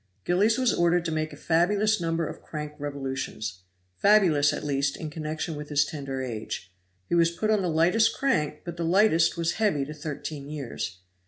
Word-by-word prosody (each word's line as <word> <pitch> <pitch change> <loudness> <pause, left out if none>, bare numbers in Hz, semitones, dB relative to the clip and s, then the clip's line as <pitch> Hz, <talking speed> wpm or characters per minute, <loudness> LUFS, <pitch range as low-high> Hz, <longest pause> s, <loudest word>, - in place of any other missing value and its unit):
Gillies 205 +6 +3
was 255 -3 +2
ordered 175 0 +2
to 165 - -1
make 155 0 -1
a - - -9
fabulous 200 +5 +2
number 165 0 0
of - - -7
crank 150 -1 -6
revolutions 130 -9 -4 0.4
fabulous, 180 -9 +5
at - - -4
least, 140 -1 0
in 155 -2 -6
connection 155 +1 -4
with 150 0 -7
his 145 -1 +3
tender 135 -3 -4
age; 110 -6 -5 0.3
he - - -3
was 170 -1 +5
put 215 +6 -1
on 210 -2 +3
the 180 - 0
lightest 175 +8 +3
crank, 155 - 0
but 170 -1 -6
the 170 - -2
lightest 170 -2 +3
was 170 0 +1
heavy 150 -11 +2
to 150 - -7
thirteen 145 -1 -6
years. 125 -11 -5
155 Hz, 185 wpm, -27 LUFS, 145-175 Hz, 0.4 s, fabulous